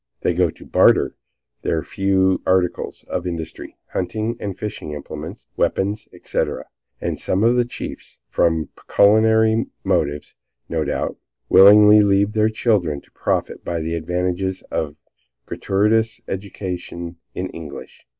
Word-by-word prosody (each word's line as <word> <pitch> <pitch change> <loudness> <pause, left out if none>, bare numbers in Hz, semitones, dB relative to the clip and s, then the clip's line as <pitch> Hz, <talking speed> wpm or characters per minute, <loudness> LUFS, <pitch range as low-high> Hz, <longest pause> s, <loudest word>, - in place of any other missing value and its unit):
They - - +1
go 90 0 +2
to - - -12
barter - - +4 0.5
their 80 -2 -1
few 95 0 +1
articles 90 -1 0
of 90 0 -3
industry, 80 -2 -6 0.2
hunting 110 +6 -2
and 100 -2 -5
fishing 105 -7 -5
implements, 75 - -8
weapons, 100 +3 0
etc., - - -3 0.3
and - - -3
some 95 +3 0
of 120 +2 +4
the 120 -1 +3
chiefs, 120 - -8
from 80 -2 +1
pecuniary 110 +2 +3 0.2
motives, 75 +1 -1 0.3
no 80 -1 -1
doubt, - - -2 0.3
willingly 105 +2 +8
leave 100 0 +3
their 110 0 +3
children 100 -10 +1
to - - -27
profit - - -2
by 85 -1 -2
the 80 +1 -3
advantages 90 +3 -2
of 75 -2 -2
a - - -30 0.5
gratuitous 110 +3 +1
education 90 -3 -5 0.2
in - - -3
English. 80 -2 -10
95 Hz, 130 wpm, -21 LUFS, 85-105 Hz, 0.5 s, willingly